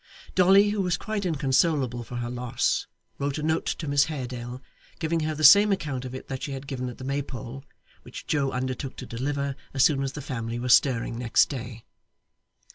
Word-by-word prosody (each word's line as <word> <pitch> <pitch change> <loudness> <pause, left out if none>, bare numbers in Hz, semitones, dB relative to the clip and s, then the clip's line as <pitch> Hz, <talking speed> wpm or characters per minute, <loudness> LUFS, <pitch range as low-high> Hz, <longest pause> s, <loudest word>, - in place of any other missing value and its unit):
Dolly, 195 +3 +6
who 205 -1 0
was 180 -3 0
quite 215 -3 -3
inconsolable 135 -4 +1
for 120 - -9
her 120 0 -3
loss, 125 0 -1 0.3
wrote 140 0 -1
a 150 - -4
note 160 +1 0
to 155 - -3
Miss 140 0 +4
Haredale 125 -4 -5 0.4
giving 165 +1 -1
her 155 0 -2
the 155 - -4
same 200 +8 +8
account 145 -9 -2
of 130 0 -6
it 130 - -8
that 130 -1 -5
she 140 - -4
had 135 +1 -6
given 130 -2 -4
at 120 - -10
the - - -9
Maypole, 135 -2 -4 0.4
which - - -10
Joe 140 -3 +1
undertook 130 +1 -3
to 130 - -7
deliver 140 +3 -3 0.2
as 135 - +4
soon 145 -3 +3
as 135 -1 -2
the 145 - -6
family 115 -4 -4
were 125 +1 -3
stirring 120 -2 +3
next 120 -2 +3
day. 120 -4 -7
135 Hz, 200 wpm, -26 LUFS, 125-155 Hz, 0.4 s, same